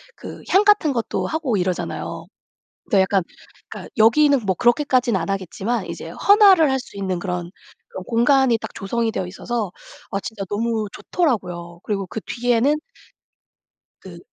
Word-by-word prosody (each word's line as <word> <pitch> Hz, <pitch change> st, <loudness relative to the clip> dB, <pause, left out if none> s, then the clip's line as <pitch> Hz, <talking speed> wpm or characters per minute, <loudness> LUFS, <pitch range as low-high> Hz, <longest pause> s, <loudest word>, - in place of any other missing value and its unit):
그 -, -, -10 dB
향 390 Hz, +2 st, +5 dB
같은 400 Hz, -9 st, +4 dB
것도 230 Hz, -2 st, -2 dB
하고 305 Hz, -9 st, -1 dB
이러잖아요. 180 Hz, -1 st, -3 dB, 0.6 s
근데 195 Hz, -, +2 dB
약간 190 Hz, 0 st, +1 dB, 0.5 s
그러니까 -, -, -9 dB
여기는 265 Hz, +3 st, +4 dB
뭐 190 Hz, -2 st, +1 dB
그렇게까지는 250 Hz, -4 st, +2 dB
안 165 Hz, -, -4 dB
하겠지만 195 Hz, +3 st, -2 dB
이제 165 Hz, -1 st, -7 dB
헌화를 390 Hz, -, +5 dB
할 265 Hz, -, +1 dB
수 250 Hz, -, -12 dB
있는 190 Hz, -2 st, -2 dB
그런 180 Hz, -1 st, -4 dB, 0.4 s
그런 185 Hz, -, -7 dB
공간이 245 Hz, +1 st, +3 dB
딱 -, -, -9 dB
조성이 225 Hz, +3 st, -2 dB
되어 185 Hz, -4 st, -3 dB
있어서 210 Hz, +1 st, -4 dB, 0.4 s
아 195 Hz, -, -1 dB
진짜 215 Hz, -3 st, -6 dB
너무 220 Hz, 0 st, -1 dB
좋더라고요. 180 Hz, -, -2 dB
그리고 200 Hz, -2 st, -2 dB
그 220 Hz, -, -5 dB
뒤에는 245 Hz, +4 st, +1 dB, 1.3 s
그 -, -, -11 dB
225 Hz, 330 characters per minute, -21 LUFS, 190-265 Hz, 1.3 s, 향